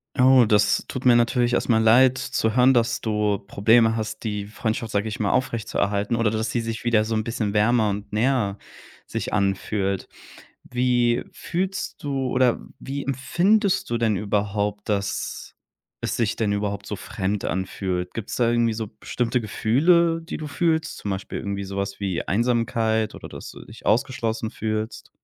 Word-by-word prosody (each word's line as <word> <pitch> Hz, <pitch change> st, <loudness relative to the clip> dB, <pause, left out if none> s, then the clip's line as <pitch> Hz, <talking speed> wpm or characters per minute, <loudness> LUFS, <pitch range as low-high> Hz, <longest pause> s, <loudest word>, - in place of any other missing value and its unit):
Oh, 130 Hz, -1 st, +6 dB
das 105 Hz, -2 st, +3 dB
tut 130 Hz, -, -6 dB
mir 125 Hz, -1 st, +7 dB
natürlich 120 Hz, +1 st, +2 dB
erstmal 115 Hz, -2 st, +2 dB
leid 125 Hz, +3 st, +6 dB
zu 110 Hz, -3 st, -1 dB
hören, 125 Hz, +1 st, +6 dB
dass 120 Hz, -1 st, +1 dB
du 105 Hz, -2 st, 0 dB
Probleme 110 Hz, +3 st, +3 dB
hast, 110 Hz, -1 st, -4 dB
die 105 Hz, -3 st, -3 dB
Freundschaft, 110 Hz, +1 st, -3 dB
sage 100 Hz, +2 st, 0 dB
ich 105 Hz, -, -5 dB
mal 100 Hz, -, +1 dB
aufrechtzuerhalten, 105 Hz, -3 st, 0 dB
oder 115 Hz, -2 st, +1 dB
dass 110 Hz, +1 st, -1 dB
sie 120 Hz, -, -1 dB
sich 115 Hz, -1 st, -4 dB
wieder 115 Hz, -3 st, +3 dB
so 110 Hz, +1 st, -3 dB
'n 110 Hz, -, 0 dB
bisschen 110 Hz, -3 st, -2 dB
wärmer 110 Hz, +1 st, +3 dB
und 100 Hz, +1 st, -6 dB
näher 110 Hz, -3 st, +1 dB, 0.5 s
sich -, -, -4 dB
anfühlt. 100 Hz, -1 st, 0 dB, 0.6 s
Wie 125 Hz, -1 st, +2 dB
fühlst 190 Hz, +3 st, -3 dB
du 135 Hz, -2 st, -1 dB
oder 125 Hz, -1 st, +2 dB, 0.2 s
wie 140 Hz, +1 st, -5 dB
empfindest 175 Hz, -, +1 dB
du 120 Hz, -, 0 dB
denn 115 Hz, -3 st, +1 dB
überhaupt, 105 Hz, +1 st, -1 dB
dass 100 Hz, -1 st, -3 dB, 0.5 s
es -, -, -1 dB
sich 115 Hz, -3 st, 0 dB
denn 110 Hz, -3 st, 0 dB
überhaupt 100 Hz, 0 st, -2 dB
so -, -, -4 dB
fremd 100 Hz, +2 st, -3 dB
anfühlt? 90 Hz, -1 st, -3 dB
Gibt's 115 Hz, -1 st, -5 dB
da 120 Hz, -2 st, +2 dB
irgendwie 120 Hz, -1 st, +2 dB
so 110 Hz, 0 st, -3 dB
bestimmte 120 Hz, 0 st, -1 dB
Gefühle, 165 Hz, -, +2 dB
die 165 Hz, -, -6 dB
du 155 Hz, -, -6 dB
fühlst? 160 Hz, +1 st, 0 dB
Zum 100 Hz, -, -4 dB
Beispiel 95 Hz, 0 st, -4 dB
irgendwie 100 Hz, -1 st, -4 dB
sowas 100 Hz, +1 st, -4 dB
wie 95 Hz, -4 st, -1 dB
Einsamkeit 110 Hz, 0 st, +1 dB
oder -, -, -9 dB
dass -, -, -8 dB
du -, -, -12 dB
dich -, -, -14 dB
ausgeschlossen 115 Hz, -1 st, 0 dB
fühlst? 110 Hz, 0 st, -4 dB
110 Hz, 165 wpm, -24 LUFS, 105-125 Hz, 0.6 s, mir